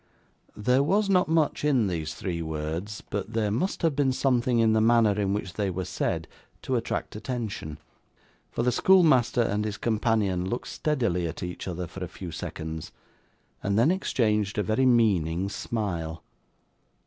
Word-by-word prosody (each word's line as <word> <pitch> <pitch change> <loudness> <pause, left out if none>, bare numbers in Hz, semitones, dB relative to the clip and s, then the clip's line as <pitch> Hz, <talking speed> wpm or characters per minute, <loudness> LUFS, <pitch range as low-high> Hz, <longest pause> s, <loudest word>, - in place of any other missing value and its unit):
There 125 +5 +3
was 200 +7 +2
not 180 -1 +4
much 160 -3 +1
in 135 -7 +3
these 80 -4 -3
three 85 -3 -3
words, 80 +6 -4
but 105 +2 -3
there 110 -2 0
must 170 - -1
have 160 -4 +2
been 140 -2 +2
something 125 -2 +1
in 115 -1 +4
the 110 - +3
manner 115 -1 +5
in 100 -1 0
which 100 -3 -3
they 100 -2 -1
were 95 0 -3
said, - - -2 0.4
to 130 - -1
attract 115 -3 -2
attention; 110 - -4 0.7
for - - -2
the 125 - +3
schoolmaster 135 -7 +4
and 105 -1 0
his 105 -1 -3
companion 105 -5 0
looked 125 +2 -3
steadily 115 - 0
at 80 - -6
each 90 +1 -5
other 90 0 -3
for 95 +2 -8
a - - -3
few 90 0 -8
seconds, 80 0 -6 0.7
and 100 0 0
then 120 +9 +5
exchanged 105 - 0
a 105 - +2
very 110 +7 +2
meaning 95 -7 +2
smile. 85 -8 -3
105 Hz, 165 wpm, -27 LUFS, 90-125 Hz, 0.7 s, manner